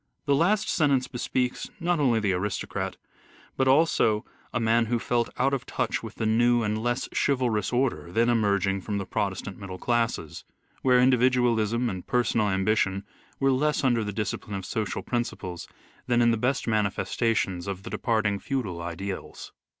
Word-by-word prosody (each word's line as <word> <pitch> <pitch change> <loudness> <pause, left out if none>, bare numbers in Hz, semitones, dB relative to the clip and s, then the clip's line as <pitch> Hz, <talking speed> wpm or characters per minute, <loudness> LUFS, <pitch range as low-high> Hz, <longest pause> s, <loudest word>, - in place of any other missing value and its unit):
The 140 - +3
last 185 +9 +2
sentence 140 -6 +2
bespeaks 125 0 -2
not 175 0 +1
only 125 -6 +3
the 100 -3 +1
aristocrat 95 +2 -3 0.6
but 130 - +1
also 130 -7 +3 0.3
a - - -1
man 115 0 +2
who 120 +1 +1
felt 120 0 0
out 135 +2 +2
of 135 - -2
touch - - -1
with - - -8
the 110 - -2
new 120 +2 +3
and 110 0 -1
less 120 +1 -1
chivalrous 120 -7 +1
order 125 -8 0
then 115 +5 +2
emerging 100 -4 +2
from 105 +1 -3
the 100 - -3
protestant 100 -1 -3
middle 95 -2 -7
classes, 115 -9 -1 0.4
where 125 -1 +4
individualism 125 -2 +3
and 95 -5 -5
personal 115 -4 +1
ambition 95 0 +1 0.4
were 135 0 +3
less 150 +3 +1
under 120 -4 +2
the 105 - -3
discipline 105 0 -3
of 95 -1 -5
social 110 -4 -3
prin 120 -1 0
ciples 90 -7 -7 0.4
than 120 -1 +3
in 120 -1 +5
the - - +2
best 125 +4 -1
manifestations 105 -3 0
of 95 -1 -4
the 115 - -8
departing 110 -4 0
feudal 105 -12 -3
ideals. 95 +3 -6
115 Hz, 165 wpm, -26 LUFS, 100-125 Hz, 0.6 s, in